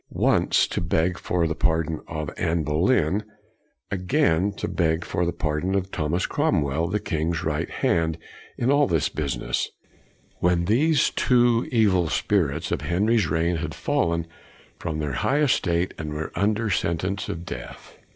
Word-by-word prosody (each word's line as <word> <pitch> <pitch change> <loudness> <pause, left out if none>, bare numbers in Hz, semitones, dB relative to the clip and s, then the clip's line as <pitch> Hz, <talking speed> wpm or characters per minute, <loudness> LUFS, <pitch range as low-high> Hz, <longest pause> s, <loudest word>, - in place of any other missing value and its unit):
Once - - +2
to - - -3
beg 85 +1 0
for 90 -2 0
the 80 - 0
pardon 80 -1 0
of 75 -2 -4
Anne 80 0 0
Boleyn, 85 - +2 0.7
again 90 -1 +1
to 100 - -5
beg 85 -1 0
for 90 0 -1
the - - +1
pardon 85 +3 -1
of 95 0 -1
Thomas 80 +4 -1
Cromwell, 80 - 0
the 105 +4 -1
king's 80 -4 -2
right 75 -1 -1
hand 80 -1 0 0.4
in 125 +3 +1
all 145 0 +4
this 80 -8 +1
business, 70 -5 -2 0.7
when 85 -1 +2
these 140 - +3
two 120 -2 +3
evil 100 -8 +3
spirits 80 -2 0
of - - -1
Henry's 100 +6 +2
reign 80 +3 +1
had - - -4
fallen 85 0 0 0.5
from 80 -3 -3
their 75 -3 -2
high 140 - +1
estate 90 - +1
and 75 -1 -4
were 80 +1 -4
under 105 +2 0
sentence 95 +3 -1
of 85 +1 -5
death. - - -8
85 Hz, 150 wpm, -24 LUFS, 80-100 Hz, 0.7 s, all